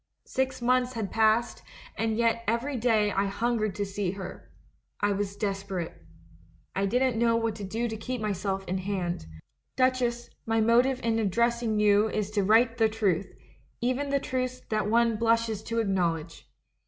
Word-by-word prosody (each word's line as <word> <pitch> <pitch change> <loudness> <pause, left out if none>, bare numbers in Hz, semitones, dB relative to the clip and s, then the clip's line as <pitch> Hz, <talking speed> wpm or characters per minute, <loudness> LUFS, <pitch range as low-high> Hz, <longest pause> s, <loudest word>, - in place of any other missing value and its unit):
Six 265 -1 -2
months 250 +1 +2
had 220 -5 -3
passed, 225 +2 +2 0.4
yet 230 +1 +1
every 235 +6 0
day 220 -3 +2
I 195 +1 +1
hungered 215 0 -1
to 205 - -1
see 195 -1 -2
her. 195 -1 -8 0.5
I 205 0 +2
was 200 0 -2
desperate. 195 -4 -3 0.8
I 195 +1 +1
didn't 250 +1 +1
know 230 -1 +3
what 230 -1 0
to 205 - -7
do 225 +5 -2
to 220 - -4
keep 255 +3 -4
myself 195 -2 -2
in 185 +1 -1
hand. 180 - -3 0.5
"Duchess, 255 -2 +1
my 225 0 +1
motive 245 +4 +3
in 225 -1 +1
addressing 230 +1 +1
you 210 +1 +4
is 210 -1 -2
to 205 -2 +1
write 230 +3 +4
the 220 -1 +4
truth, 200 -5 0 0.5
even 255 +4 -1
the 280 0 +2
truths 255 -1 -3
that 215 -1 0
one 230 0 +3
blushes 230 -1 +1
to 230 - -3
acknowledge. 170 -6 -1
220 Hz, 160 wpm, -28 LUFS, 200-235 Hz, 0.8 s, you